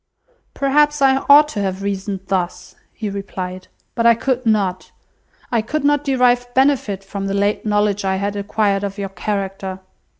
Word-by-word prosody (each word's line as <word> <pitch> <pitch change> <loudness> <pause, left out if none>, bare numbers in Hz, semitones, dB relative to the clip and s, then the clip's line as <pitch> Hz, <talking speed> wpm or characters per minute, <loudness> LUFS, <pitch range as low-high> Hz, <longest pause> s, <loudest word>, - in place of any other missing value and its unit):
"Perhaps 295 +2 +2
I 265 0 +5
ought 295 +1 +8
to 210 -8 -3
have 190 0 -3
reasoned 195 -1 -3
thus," 180 -1 -3 0.2
he 220 - -6
replied, 185 -2 -6 0.3
"but 230 - -1
I 235 - +6
could 255 0 -1
not. 195 -4 0 0.6
I 235 -2 +2
could 300 +8 -3
not 290 0 +2
derive 250 -3 +2
benefit 260 -8 +2
from 195 0 -5
the 195 - -2
late 205 +2 0
knowledge 205 -1 +1
I 190 0 0
had 200 +1 -2
acquired 200 0 0
of 200 0 -4
your 200 -1 -4
character. 195 -1 -4
205 Hz, 165 wpm, -19 LUFS, 195-245 Hz, 0.6 s, ought